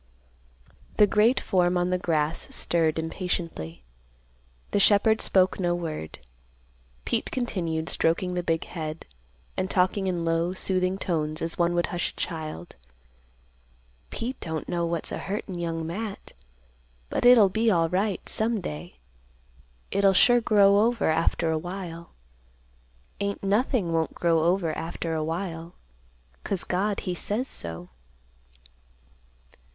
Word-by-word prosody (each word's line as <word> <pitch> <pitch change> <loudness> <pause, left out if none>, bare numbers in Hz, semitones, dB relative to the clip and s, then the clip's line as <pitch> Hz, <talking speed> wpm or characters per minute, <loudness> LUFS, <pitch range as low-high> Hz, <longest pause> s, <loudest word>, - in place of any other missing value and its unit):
The 210 - +7
great 215 +5 +3
form 180 -1 +1
on 180 +1 0
the 180 - +1
grass 155 -3 0
stirred 165 -2 +1
impatiently. 160 - -4 0.9
The 205 - +2
shepherd 215 +2 +4
spoke 185 0 +2
no 175 -2 +1
word. 160 - -5 0.9
Pete - - -1
continued, 170 -10 -2
stroking 175 +3 0
the 180 - -1
big 165 -2 0
head, 155 -2 -6 0.5
and 185 - -2
talking 190 +1 +1
in 175 -2 -1
low, 165 +2 +1
soothing 185 0 0
tones, 155 -4 -2
as 165 +1 -2
one 175 0 +2
would 175 - +2
hush 175 - 0
a - - -15
child, 155 - -5 1.3
"Pete 245 +3 -4
don't 160 -1 -4
know 170 -1 -1
what's 170 0 -3
a - - -3
hurtin' 195 -2 -4
Young 165 -1 -3
Matt, 200 +5 -6 0.8
but - - -1
it'll 245 -4 +8
be 220 +4 +1
alright, 180 +3 0
some 225 0 +1
day. 80 - -7 1.0
It'll 200 -1 +4
sure 240 +5 +5
grow 200 -3 +5
over 230 -5 +2
after 165 0 +1
awhile. 170 +1 -5 1.1
Ain't 200 0 -3
nothing 205 -2 +1
won't 160 -1 0
grow 165 -2 +2
over 175 -2 +1
after 165 0 -4
awhile; 165 +1 -4 0.7
'cause 195 - -1
God 200 +3 -1
he 180 - -3
says 210 +8 -2
so." 85 +1 -5
175 Hz, 125 wpm, -26 LUFS, 165-200 Hz, 1.3 s, it'll